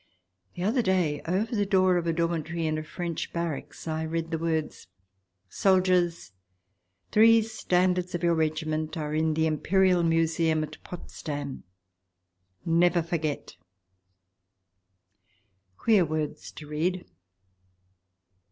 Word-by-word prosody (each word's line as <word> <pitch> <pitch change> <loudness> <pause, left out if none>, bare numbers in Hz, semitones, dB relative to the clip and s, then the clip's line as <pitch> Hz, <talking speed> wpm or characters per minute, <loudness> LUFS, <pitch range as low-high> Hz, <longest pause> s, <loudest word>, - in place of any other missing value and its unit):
The 180 - -4
other 230 +6 +2
day, 180 -8 +1
over 210 +7 0
the 205 - +2
door 185 -2 +3
of 170 -1 -2
a - - +3
dormitory 170 0 -1
in 155 0 0
a - - -5
French 170 +1 -4
barracks, 170 -2 -5
I 160 0 -2
read 165 +1 -3
the 160 - -1
words: 160 - -2 0.3
" 95 0 -50 0.2
Soldiers! 180 - +2 0.8
Three 225 +1 +6
standards 180 -4 0
of 175 - -4
your 170 0 +3
regiment 155 0 -1
are 150 -1 -3
in 155 0 +1
the 160 0 +2
Im 155 -2 0
perial 185 -1 +3
Museum 165 -1 +2
at 155 0 -9
Potsdam. 145 -5 -7 1.0
Never 170 +1 +3
forget 160 -3 -3 1.5
!" 95 -1 -44
Queer 215 -5 +4
words 155 -2 -3
to 155 - -10
read 170 +5 -2
165 Hz, 125 wpm, -27 LUFS, 155-180 Hz, 1.5 s, Three